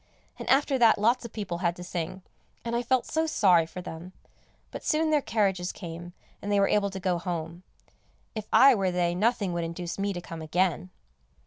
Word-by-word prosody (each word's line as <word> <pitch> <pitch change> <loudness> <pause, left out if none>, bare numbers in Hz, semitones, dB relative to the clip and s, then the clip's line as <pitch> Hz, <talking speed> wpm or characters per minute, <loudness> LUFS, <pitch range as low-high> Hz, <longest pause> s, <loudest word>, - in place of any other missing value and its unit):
And - - -5
after 270 0 +3
that 230 -2 +6
lots 235 +4 +2
of 235 - -7
people 190 -6 -4
had 175 -2 0
to 180 - -9
sing, 180 +1 -5 0.4
and 235 0 -2
I 240 - +1
felt 250 +1 +1
so 320 0 -1
sorry 180 - +4
for 180 +2 -8
them; 175 +2 -8 0.6
but - - -7
soon 310 +1 +1
their 300 -1 +3
carriages 195 -7 0
came, 175 -1 -8 0.3
and 205 - -4
they 205 - +3
were 195 - +4
able 205 -1 +2
to 190 0 -6
go 180 -2 0
home; 170 -1 -5 0.7
if 215 -2 -6
I 270 +1 +8
were 195 -5 +1
they 175 -1 0
nothing 205 -1 0
would 170 -1 -2
induce 170 +2 -5
me 200 0 0
to 180 - -4
come 165 -2 -8
again. 180 +2 0
185 Hz, 205 wpm, -27 LUFS, 175-225 Hz, 0.7 s, I